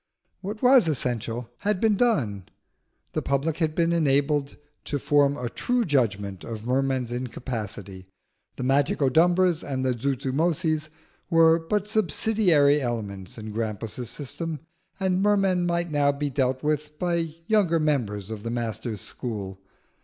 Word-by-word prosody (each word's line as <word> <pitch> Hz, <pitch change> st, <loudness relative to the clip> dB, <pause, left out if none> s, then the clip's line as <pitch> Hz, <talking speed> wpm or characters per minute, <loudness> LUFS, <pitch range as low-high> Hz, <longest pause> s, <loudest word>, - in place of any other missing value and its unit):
What 210 Hz, +4 st, -6 dB
was 250 Hz, -6 st, +6 dB
essential 120 Hz, -5 st, -2 dB
had 205 Hz, -2 st, 0 dB
been 220 Hz, 0 st, +3 dB
done: 120 Hz, -, 0 dB, 0.6 s
the -, -, -1 dB
public 140 Hz, +3 st, 0 dB
had 155 Hz, -2 st, 0 dB
been 170 Hz, 0 st, +2 dB
enabled 145 Hz, -2 st, +1 dB, 0.3 s
to 145 Hz, -, -2 dB
form 145 Hz, 0 st, +2 dB
a 125 Hz, -, -3 dB
true 245 Hz, -, 0 dB
judgment 100 Hz, -, 0 dB
of 110 Hz, -1 st, -7 dB
Merman's 130 Hz, -1 st, 0 dB
incapacity, 110 Hz, -6 st, -5 dB, 0.5 s
the -, -, -5 dB
Magicodumbras 160 Hz, +6 st, +3 dB
and 130 Hz, -2 st, -3 dB
Zuzumotzis 150 Hz, +6 st, 0 dB, 0.4 s
were 165 Hz, -1 st, +5 dB
but 200 Hz, +5 st, -1 dB
subsidiary 180 Hz, -7 st, +3 dB
elements 105 Hz, -7 st, -4 dB
in 110 Hz, -1 st, -7 dB
Grampus's 110 Hz, +2 st, -4 dB
system, 155 Hz, +1 st, -5 dB, 0.4 s
and 190 Hz, -1 st, +1 dB
Merman 195 Hz, -3 st, +2 dB
might 170 Hz, -1 st, -1 dB
now 145 Hz, -1 st, +3 dB
be 145 Hz, 0 st, -3 dB
dealt 130 Hz, -1 st, 0 dB
with 150 Hz, 0 st, -1 dB
by 170 Hz, -2 st, -1 dB
younger 190 Hz, -6 st, +3 dB
members 110 Hz, -10 st, -1 dB
of 110 Hz, -2 st, -5 dB
the 115 Hz, -, -4 dB
master's 115 Hz, -2 st, -3 dB
school. 100 Hz, -6 st, -6 dB
145 Hz, 130 wpm, -25 LUFS, 120-170 Hz, 0.6 s, was